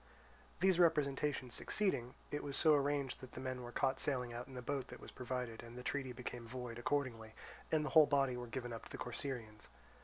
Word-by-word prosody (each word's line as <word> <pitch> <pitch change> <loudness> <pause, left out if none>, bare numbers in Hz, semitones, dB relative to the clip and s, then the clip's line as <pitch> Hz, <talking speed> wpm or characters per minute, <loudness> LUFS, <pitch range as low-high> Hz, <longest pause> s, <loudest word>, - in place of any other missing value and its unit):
These 185 -2 +5
representations 145 -6 +3
succeeding, 130 - +1 0.2
it 145 - -1
was 140 -1 -1
so 155 -2 +6
arranged 140 -2 +1
that 130 - -10
the - - -6
men 130 -1 -3
were 120 0 -6
caught 135 +1 +1
sailing 125 -4 0
out 120 +2 -5
in 135 - -10
the 125 - -4
boat 140 +1 -1
that - - -9
was - - -10
provided, 125 -2 -3
and 120 +1 -10
the 125 - -6
treaty 135 -1 -1
became 120 -1 -6
void 120 -1 -5
accordingly, 120 -6 -1 0.4
and 155 -1 +3
the - - -1
whole 155 -3 +9
body 135 -3 +3
were 125 0 -5
given 120 0 -4
up 115 - -6
to - - -12
the - - -5
Corcyraeans. 120 -4 -4
130 Hz, 215 wpm, -38 LUFS, 120-145 Hz, 0.4 s, whole